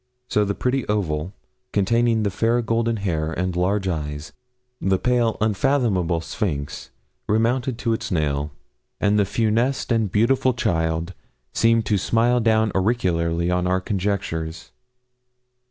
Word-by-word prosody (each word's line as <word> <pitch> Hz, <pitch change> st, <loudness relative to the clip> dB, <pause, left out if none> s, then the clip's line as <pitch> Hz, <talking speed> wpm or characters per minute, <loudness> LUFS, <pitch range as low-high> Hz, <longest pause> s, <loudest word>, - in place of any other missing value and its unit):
So 105 Hz, -, +2 dB
the 100 Hz, -1 st, -1 dB
pretty 130 Hz, +1 st, 0 dB
oval, 90 Hz, -5 st, -1 dB, 0.4 s
containing 115 Hz, +2 st, +2 dB
the 100 Hz, -, 0 dB
fair 115 Hz, +4 st, +1 dB
golden 115 Hz, 0 st, 0 dB
hair 80 Hz, -6 st, -1 dB
and 90 Hz, +1 st, -2 dB
large 95 Hz, +2 st, 0 dB
eyes, 75 Hz, -3 st, -4 dB, 0.5 s
the 95 Hz, 0 st, +2 dB
pale, 120 Hz, 0 st, +1 dB
unfathomable 105 Hz, -6 st, +1 dB
sphinx, 75 Hz, -6 st, -4 dB, 0.4 s
remounted 115 Hz, +3 st, +1 dB
to 115 Hz, -2 st, 0 dB
its 110 Hz, -, -3 dB
nail, 75 Hz, -3 st, 0 dB, 0.5 s
and 105 Hz, 0 st, +2 dB
the 100 Hz, -, +3 dB
funeste 115 Hz, +6 st, 0 dB
and 110 Hz, -4 st, +1 dB
beautiful 125 Hz, +4 st, +2 dB
child 85 Hz, -5 st, -1 dB, 0.4 s
seemed 115 Hz, -1 st, +3 dB
to 105 Hz, -1 st, +1 dB
smile 120 Hz, +5 st, +2 dB
down 110 Hz, -2 st, +2 dB
oracularly 90 Hz, -5 st, +1 dB
on 90 Hz, 0 st, +1 dB
our 95 Hz, +1 st, +2 dB
conjectures. 90 Hz, -5 st, -3 dB
100 Hz, 130 wpm, -22 LUFS, 85-115 Hz, 0.5 s, the